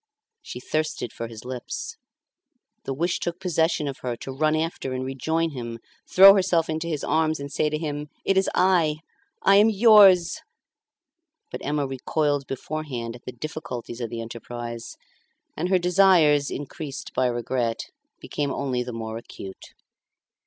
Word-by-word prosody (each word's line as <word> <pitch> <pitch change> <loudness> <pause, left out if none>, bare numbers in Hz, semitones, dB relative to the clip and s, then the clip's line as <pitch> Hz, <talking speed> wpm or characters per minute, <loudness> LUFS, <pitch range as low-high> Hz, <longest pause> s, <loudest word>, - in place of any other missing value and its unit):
She - - -8
thirsted 155 -4 -2
for 115 - -5
his 115 0 -11
lips. 125 -1 -5 0.9
The 135 - -2
wish 170 +5 0
took 175 +1 -3
possession 165 -4 +1
of 135 - -5
her 125 -2 -3
to 135 - -8
run 155 +3 +1
after 155 -4 -2
and 130 0 -3
rejoin 160 +5 -1
him, 120 -4 -6 0.3
throw 195 +1 +10
herself 180 -5 +2
into 160 +1 -3
his 155 -3 -3
arms 160 -1 +1
and 140 0 -6
say 155 - +1
to 155 - -2
him, 150 -1 -4 0.2
"It 195 - +2
is 190 0 +3
I; 175 -5 +3 0.5
I 195 0 +6
am 210 +2 +6
yours." 200 -5 +6 1.1
But - - -6
Emma 145 0 0
recoiled 140 +1 -1
beforehand 135 -4 -5
at 125 - -15
the - - -5
difficulties 125 -3 -6
of 115 - -3
the 115 0 -5
enterprise, 115 0 -7 0.6
and 175 +3 -2
her 190 - +4
desires, 175 -5 +4
increased 145 0 -6
by 130 - +2
regret, 120 -1 -2 0.3
became 145 -1 -3
only 130 -3 -1
the 125 0 -5
more 110 0 -5
acute. 95 -4 -11
145 Hz, 155 wpm, -25 LUFS, 125-165 Hz, 1.1 s, throw